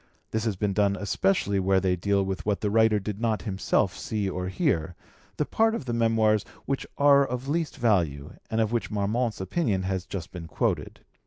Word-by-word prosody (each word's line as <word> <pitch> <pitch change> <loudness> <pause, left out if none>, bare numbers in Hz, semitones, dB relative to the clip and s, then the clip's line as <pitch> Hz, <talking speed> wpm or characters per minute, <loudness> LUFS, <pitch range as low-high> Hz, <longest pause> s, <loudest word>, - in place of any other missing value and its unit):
This 110 0 -1
has 110 -3 0
been 100 +1 -1
done 100 -1 +2
especially 100 0 +1
where 95 0 +3
they 95 -1 +1
deal 100 +2 +1
with 95 0 -3
what 105 -1 -1
the 105 - 0
writer 110 0 +4
did 105 +1 -5
not 110 -2 0
himself 95 -2 0
see 105 -3 -2
or 90 -1 -3
hear, 95 - 0 0.4
the 150 - +1
part 225 +6 +2
of 185 - -5
the 120 - -2
Memoirs 115 -2 +2 0.2
which 135 -1 -2
are 140 -1 +6
of 125 0 -4
least 160 +1 -1
value 85 - +1 0.2
and 110 - -1
of 110 -1 +1
which 120 -1 -1
Marmont's 110 +3 -1
opinion 95 - -1
has 95 -1 -2
just 90 -5 -6
been 85 -3 -8
quoted. - - -2
105 Hz, 195 wpm, -26 LUFS, 95-115 Hz, 0.4 s, are